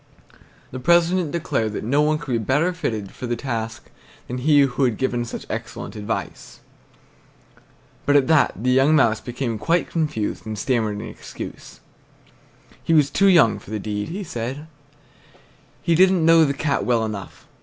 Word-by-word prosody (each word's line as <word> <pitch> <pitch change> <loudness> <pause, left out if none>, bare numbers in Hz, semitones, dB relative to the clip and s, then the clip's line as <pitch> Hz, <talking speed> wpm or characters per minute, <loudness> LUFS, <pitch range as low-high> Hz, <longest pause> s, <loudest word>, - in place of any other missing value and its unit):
The 130 - -6
president 170 +3 +3
declared 115 -10 -1
that - - -4
no 140 +7 +2
one 155 +1 +2
could 150 -3 -7
be 115 - +1
better 145 - +1
fitted 110 - -4
for 125 - -7
the 120 - -1
task 115 -3 -5 0.4
than 125 +1 -4
he 145 +2 +4
who 135 0 +1
had 120 -4 0
given 120 -2 -1
such 115 - -7
excellent - - -6
advice. 105 -1 -5 1.5
But 145 - +4
at 140 -2 +5
that 160 -1 +3
the 125 - +2
young 135 +4 +4
mouse 115 -7 +3
became 120 -3 -4
quite 170 +8 0
confused 150 -10 -2
and 110 -1 -6
stammered 110 -3 0
an - - -6
excuse. - - -10 1.0
He 165 - +2
was 145 -3 +4
too 195 - +3
young 165 - +5
for - - -15
the 110 - -3
deed, 105 0 -4
he 195 +5 -5
said. 135 -2 -5 1.2
He 170 - +2
didn't 185 -1 +4
know 165 -1 +6
the 140 - 0
Cat 145 0 -1
well 115 -2 +1
enough. 105 -3 -7
130 Hz, 170 wpm, -22 LUFS, 115-160 Hz, 1.5 s, know